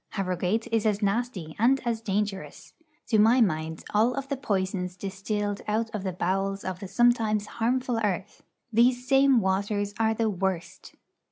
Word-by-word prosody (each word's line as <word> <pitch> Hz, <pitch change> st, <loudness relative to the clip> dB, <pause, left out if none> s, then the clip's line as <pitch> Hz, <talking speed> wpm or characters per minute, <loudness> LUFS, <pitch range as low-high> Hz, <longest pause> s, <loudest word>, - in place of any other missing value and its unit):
Harrogate 190 Hz, +2 st, -1 dB
is 225 Hz, -1 st, +2 dB
as 210 Hz, 0 st, 0 dB
nasty, 200 Hz, -6 st, -2 dB
and 255 Hz, +5 st, +4 dB
as 230 Hz, -2 st, -1 dB
dangerous. 205 Hz, -2 st, -3 dB, 0.4 s
To 220 Hz, -, +3 dB
my 225 Hz, +4 st, +5 dB
mind, 160 Hz, -6 st, 0 dB
of -, -, -19 dB
all 230 Hz, +5 st, +2 dB
the 275 Hz, +1 st, -4 dB
poisons 190 Hz, -7 st, -2 dB
distilled 200 Hz, +2 st, -3 dB
out 225 Hz, +2 st, -1 dB
of 210 Hz, -3 st, -3 dB
the 190 Hz, -, -2 dB
bowels 195 Hz, +3 st, -1 dB
of 185 Hz, -1 st, -4 dB
the 195 Hz, -, -6 dB
sometimes 220 Hz, 0 st, +2 dB
harmful 240 Hz, +2 st, -1 dB
earth, 205 Hz, -2 st, -2 dB, 0.3 s
these 245 Hz, +2 st, +3 dB
same 270 Hz, -2 st, +5 dB
waters 200 Hz, +1 st, -1 dB
are 220 Hz, 0 st, +2 dB
the 225 Hz, 0 st, +1 dB
worst. 190 Hz, -3 st, -3 dB
210 Hz, 160 wpm, -27 LUFS, 190-230 Hz, 0.4 s, my